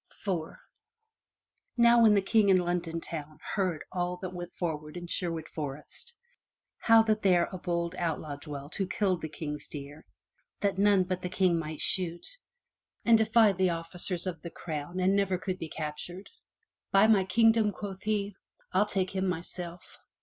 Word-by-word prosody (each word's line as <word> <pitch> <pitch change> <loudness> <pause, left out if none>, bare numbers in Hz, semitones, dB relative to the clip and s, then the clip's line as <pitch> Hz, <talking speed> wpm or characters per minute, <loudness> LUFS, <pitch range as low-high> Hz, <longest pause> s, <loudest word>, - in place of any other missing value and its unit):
IV 170 -5 -2 1.2
Now 235 0 +6
when 220 -2 +6
the 200 - +3
King 210 0 +3
in 190 - +6
London 175 -2 -1
town 155 -2 -7 0.2
heard 185 -6 -1
all 180 -1 -2
that 185 -1 -4
went 175 -1 -6
forward 155 -2 -4
in 175 - -6
Sherwood 165 -2 -2
Forest, 150 - -8 0.6
how 225 -1 +6
that 215 -1 +1
there 180 -3 +4
a 185 - -6
bold 170 -1 -2
outlaw 160 -4 -3
dwelt 145 -1 -8
who 195 -2 -1
killed 185 -4 0
the 160 - -4
King's 150 -1 -6
deer 145 +1 -9 0.6
that 200 -2 0
none 200 -2 +5
but 185 0 -3
the 180 - -3
King 180 -2 +2
might 155 -1 -5
shoot, 175 -2 +1 0.8
and 230 - +7
defied 220 -3 +4
the 185 -1 +4
officers 170 +2 -3
of 170 -4 -4
the 170 - -6
crown 165 +1 -5
and 185 +2 +3
never 195 -2 +1
could 185 0 -4
be 165 - -5
captured, 160 +5 -6 0.6
By 195 +2 +6
my 215 -3 +5
kingdom,'' 225 +2 +4
quoth 195 -1 -7
he, 210 -1 -1 0.4
"I'll 200 +3 +3
take 185 -2 -1
him 190 0 -1
myself!" 175 0 -6
180 Hz, 165 wpm, -29 LUFS, 165-200 Hz, 1.2 s, and